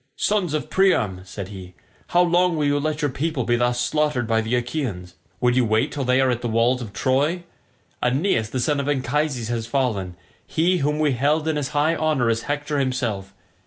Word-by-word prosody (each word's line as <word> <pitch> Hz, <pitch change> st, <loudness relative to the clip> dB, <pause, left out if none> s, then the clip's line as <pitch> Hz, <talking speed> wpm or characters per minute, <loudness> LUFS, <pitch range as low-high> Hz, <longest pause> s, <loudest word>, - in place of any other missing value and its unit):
"Sons 190 Hz, -7 st, 0 dB
of 155 Hz, -, -3 dB
Priam," 110 Hz, -, +2 dB
said 95 Hz, 0 st, -7 dB
he, 95 Hz, -3 st, -10 dB, 0.3 s
"how 175 Hz, +1 st, +4 dB
long 175 Hz, 0 st, +2 dB
will 150 Hz, -, +1 dB
you 145 Hz, 0 st, +2 dB
let 155 Hz, 0 st, -2 dB
your 145 Hz, -, +1 dB
people 140 Hz, 0 st, -2 dB
be 120 Hz, +1 st, +1 dB
thus 120 Hz, 0 st, +1 dB
slaughtered 130 Hz, 0 st, 0 dB
by 110 Hz, 0 st, +1 dB
the 110 Hz, +2 st, -1 dB
Achaeans? 120 Hz, -, -3 dB, 0.3 s
Would 125 Hz, -1 st, +2 dB
you 130 Hz, -, +4 dB
wait 110 Hz, -1 st, +1 dB
till 140 Hz, -, -3 dB
they 125 Hz, +1 st, +3 dB
are 130 Hz, -1 st, +3 dB
at 120 Hz, -1 st, -2 dB
the 120 Hz, -, -2 dB
walls 120 Hz, +3 st, +2 dB
of 110 Hz, -4 st, -7 dB
Troy? 145 Hz, -, 0 dB, 0.6 s
Aeneas 125 Hz, -, +1 dB
the 130 Hz, -, -3 dB
son 145 Hz, +4 st, +1 dB
of 140 Hz, +1 st, -2 dB
Anchises 135 Hz, -3 st, -1 dB
has 115 Hz, -1 st, -2 dB
fallen, 110 Hz, -9 st, -1 dB, 0.3 s
he 175 Hz, +3 st, +1 dB
whom 150 Hz, +1 st, 0 dB
we 155 Hz, -2 st, +2 dB
held 145 Hz, +5 st, +1 dB
in 160 Hz, -, +1 dB
as 145 Hz, -2 st, -1 dB
high 155 Hz, +3 st, +3 dB
honour 155 Hz, -7 st, +1 dB
as 115 Hz, 0 st, -1 dB
Hector 145 Hz, +3 st, -2 dB
himself. 115 Hz, -8 st, -2 dB
130 Hz, 205 wpm, -23 LUFS, 115-150 Hz, 0.6 s, how